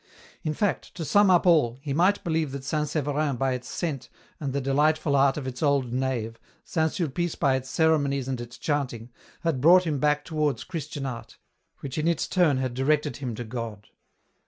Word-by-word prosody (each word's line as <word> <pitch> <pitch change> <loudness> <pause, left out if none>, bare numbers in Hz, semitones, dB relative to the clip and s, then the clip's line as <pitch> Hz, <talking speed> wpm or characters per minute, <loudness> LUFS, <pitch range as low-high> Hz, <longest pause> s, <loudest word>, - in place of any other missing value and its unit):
In 155 -1 -2
fact, 205 +1 -1
to 165 - -4
sum 205 +7 +4
up 180 -1 +4
all, 150 -9 +4
he 140 0 -4
might 185 +7 +2
believe 160 -5 -1
that 140 -1 -5
St. 150 +2 -1
Severin 145 -1 0
by 130 +1 0
its 125 0 -6
scent, 150 -7 -4 0.3
and 140 -3 -3
the 140 - -1
delightful 145 +2 +2
art 135 0 +4
of 145 - -4
its 130 -1 -6
old 140 -5 +1
nave, 125 -3 -2 0.3
St. 160 -1 0
Sulpice 175 0 -2
by 135 -2 +2
its 130 0 -4
ceremonies 145 -5 +1
and 130 -2 -3
its 120 0 -9
chanting, 125 -6 -2 0.3
had 160 -7 -1
brought 180 +5 +6
him 150 -4 -1
back 150 +1 +1
towards 150 -6 -1
Christian 155 -5 -5
art, 125 -3 -7 0.4
which 140 +2 -4
in 155 - 0
its 170 -3 +1
turn 170 -7 +3
had 130 -2 -2
directed 150 +3 +1
him 125 -5 -4
to 120 - -5
God. 115 -3 -6
140 Hz, 195 wpm, -26 LUFS, 130-160 Hz, 0.4 s, brought